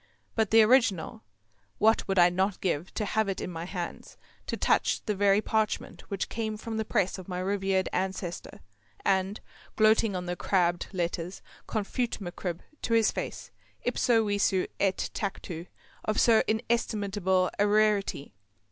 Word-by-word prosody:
But 220 -3 +1
the 225 0 +7
original, 215 -8 +2 0.6
what 220 +2 +3
would 195 -1 -1
I 175 0 +7
not 190 +2 0
give 175 -2 -1
to 215 - -1
have 215 0 0
it 195 - -2
in - - -4
my 165 0 -5
hands, 175 -2 -6 0.3
to - - -2
touch - - +1
the 210 - 0
very 200 +1 +3
parchment 220 -1 -2
which 200 -2 -2
came 220 -2 -3
from 225 +1 -5
the 220 - 0
press 190 -2 0
of 185 - -10
my 180 -2 -4
revered 190 0 0
ancestor, 185 -1 -3 0.4
and, 190 +2 +1 0.4
gloating 215 -1 +4
on 180 -1 -3
the 175 0 -2
crabbed 175 -1 +1
letters, 175 0 -3 0.2
confute 225 +3 -2
MacCribb 175 -2 -5 0.2
to 230 - +1
his 225 -1 +4
face - - -5 0.3
ipso 230 -3 +2
visu 205 -2 +1
et 195 -1 0
tactu 180 -4 -4 0.4
of 215 - 0
so 225 -2 +6
inestimable 205 -5 0
a 205 - +4
rarity. 205 - +1
195 Hz, 155 wpm, -28 LUFS, 185-215 Hz, 0.6 s, the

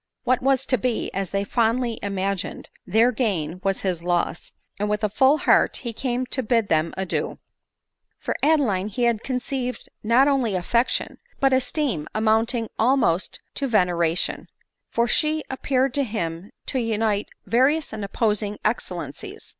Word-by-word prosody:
What 255 0 +2
was 265 0 +2
to 255 -3 +1
be, 245 +1 -1
as 195 -2 -2
they 200 0 -1
fondly 230 +2 0
imagined, 195 -1 -3 0.2
their 225 +6 +4
gain, 185 - -1
was 195 -1 0
his 180 -4 -1
loss, 175 0 -1 0.3
and 210 +1 0
with 210 +1 -1
a 210 - +2
full 265 +7 +4
heart - - +3
he 235 -2 -4
came 250 +1 -2
to 260 - -2
bid 230 -2 +1
them 160 +1 +2
adieu. 190 -2 -2 0.8
For - - -3
Adeline 255 -12 +2
he 230 +4 -2
had 235 -2 +2
conceived 250 0 -3
not 235 +5 +4
only 260 -8 +1
affection, 235 +7 0 0.2
but 270 -1 +3
esteem 260 - 0
amounting 225 +2 +2
almost 225 -7 +2
to 275 - -2
veneration; 175 -6 +1 0.4
for 235 +1 +1
she 310 +3 +1
appear 265 0 +1
ed 270 - -3
to 280 - +1
him 190 -5 -4 0.2
to 265 - -1
unite 220 -3 0 0.2
various 275 +6 +2
and 215 -2 -4
opposing 210 0 0
excellencies. 215 +3 -4
225 Hz, 155 wpm, -24 LUFS, 195-255 Hz, 0.8 s, their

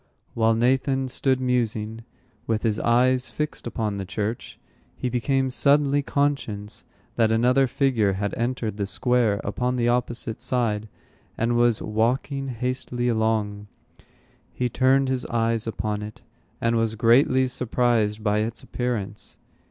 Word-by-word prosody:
While 115 0 +2
Nathan 130 +2 +1
stood 130 0 +1
musing, 115 -3 -1 0.4
with 110 -1 0
his 110 -2 +1
eyes 125 +2 +2
fixed 150 -5 -4
upon 110 -3 -2
the 100 - -3
church, 105 +4 -4 0.4
he 125 - -3
became 130 +2 0
suddenly 145 +1 +3
conscious 135 -8 -2 0.3
that 110 -2 +3
another 125 +4 +3
figure 120 -6 +1
had 100 +2 -2
entered 120 -3 -2
the 100 -2 -2
square 120 -2 +1
upon 125 +5 -1
the 120 -1 +1
opposite 120 -2 -2
side, 115 -4 -1 0.5
and 115 +1 +1
was 120 -2 +2
walking 125 +6 0
hastily 125 0 -2
along. 110 -2 0 0.8
He 125 -1 -2
turned 130 +2 +3
his 130 -1 -1
eyes 115 -1 0
upon 105 -2 -2
it, 105 0 -9 0.4
and 115 0 +1
was 115 -1 0
greatly 130 +3 +4
surprised 115 -4 0
by 105 -1 +2
its 110 +2 -3
appearance. 115 -5 -4
120 Hz, 135 wpm, -24 LUFS, 110-130 Hz, 0.8 s, greatly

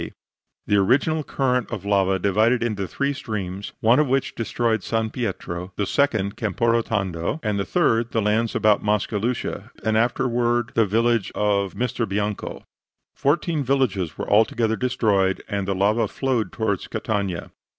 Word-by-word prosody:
D. - - -6 0.5
The 105 - +2
original 140 +10 +2
current 125 -3 0
of 100 - -5
lava 95 -2 +2
divided 110 +6 +2
into 105 -5 -2
three 140 +10 -1
streams, 100 -6 -5
one 115 +4 +5
of 150 - +3
which 135 +1 0
destroyed 115 -1 -1
San 110 +2 -1
Pietro, 95 -5 -4
the 105 - -1
second 110 -6 +1
Camporotondo, 105 - 0
and 105 -2 0
the 100 - -1
third 120 -10 +2
the 115 - 0
lands 110 +2 +1
about 105 -2 +3
Mascalucia 105 +3 -1 0.2
and 110 0 +2
afterward 120 0 +1
the 115 -2 +3
village 115 0 +1
of 100 -2 0
Misterbianco. 105 -3 -2 0.5
Fourteen 150 +1 0
villages 110 - 0
were - - -4
altogether 110 +1 +3
destroyed, 105 -6 +1
and 100 -2 -2
the 100 - 0
lava 105 +4 +2
flowed 125 -1 -1
toward 105 -4 -2
Catania. 100 -5 -2
110 Hz, 145 wpm, -23 LUFS, 100-120 Hz, 0.5 s, one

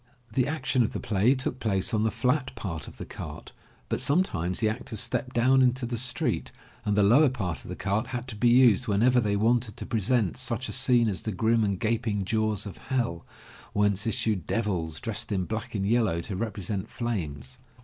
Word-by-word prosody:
The 130 -1 +2
action 135 -4 0
of 115 - 0
the - - -3
play 110 +6 +2
took 130 -1 -3
place 110 0 0
on 110 - +2
the 110 - +2
flat 130 +3 0
part 85 -9 -5
of - - -12
the - - -6
cart, - - -8 0.4
but - - -1
some 165 +6 +4
times 90 - -3
the 110 - +2
actors 110 0 -3
stepped 125 +1 -2
down 130 +3 +4
into 130 0 +2
the 120 0 -3
street, 125 +1 -1 0.3
and 105 0 0
the 105 - +5
lower 130 +9 +6
part 95 - -3
of - - -11
the - - -4
cart 105 +4 -1
had 125 -1 -5
to 110 - -5
be 120 +3 +3
used 125 -1 +5
whenever 115 +5 +3
they 105 -3 0
wanted 115 +1 +1
to - - -6
present 110 -1 +1
such 130 -1 -1
a - - -5
scene 125 -3 +4
as 95 -4 -1
the 110 - -3
grim 110 +3 +2
and 100 -3 -1
gaping 110 -3 0
jaws 110 0 0
of 100 -4 -8
Hell, 120 -11 -2 0.5
whence 105 0 +1
issued 105 -5 0
devils, 90 -8 -1
dressed 115 -1 -3
in 95 -3 0
black 110 +2 -5
and 100 -1 -1
yellow 110 -5 +2
to 95 +3 -5
represent 100 0 -3
flames. 75 - -4
110 Hz, 210 wpm, -27 LUFS, 100-125 Hz, 0.5 s, lower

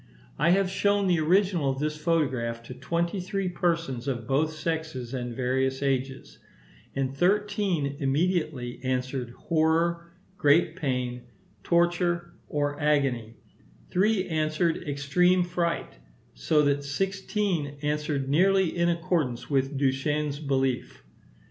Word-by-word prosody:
I - - +4
have 195 +2 +4
shown 200 +1 +1
the 180 -3 +3
original 175 -2 +2
of 135 - -1
this 150 +2 -1
photograph 135 -8 0
to 125 - -8
twenty 170 +8 -2
three 190 +1 -2
persons 165 -8 -1
of 120 -4 -2
both 145 +6 +1
sexes 155 -6 -4
and 120 -2 -4
various 130 +2 0
ages; 135 -1 -2 0.6
and 135 -1 -1
thirteen 190 -5 +1
immediately 145 -3 0
answered 130 -1 -2
horror, 170 +1 +1 0.3
great 155 +2 +4
pain, 125 -6 -2 0.4
torture, 175 - +1
or 145 0 -2
agony; 135 -7 +1 0.6
three 195 +1 +2
answered 160 +1 0
extreme 180 +6 +3
fright; 175 -1 -2 0.3
so 150 - +2
that 145 0 +1
sixteen 190 -1 -2
answered 150 -2 -1
nearly 190 +5 +3
in 170 0 +2
accordance 165 -8 -1
with 135 0 +1
Duchenne's 145 +2 0
belief. 135 -3 -1
150 Hz, 115 wpm, -27 LUFS, 135-175 Hz, 0.6 s, I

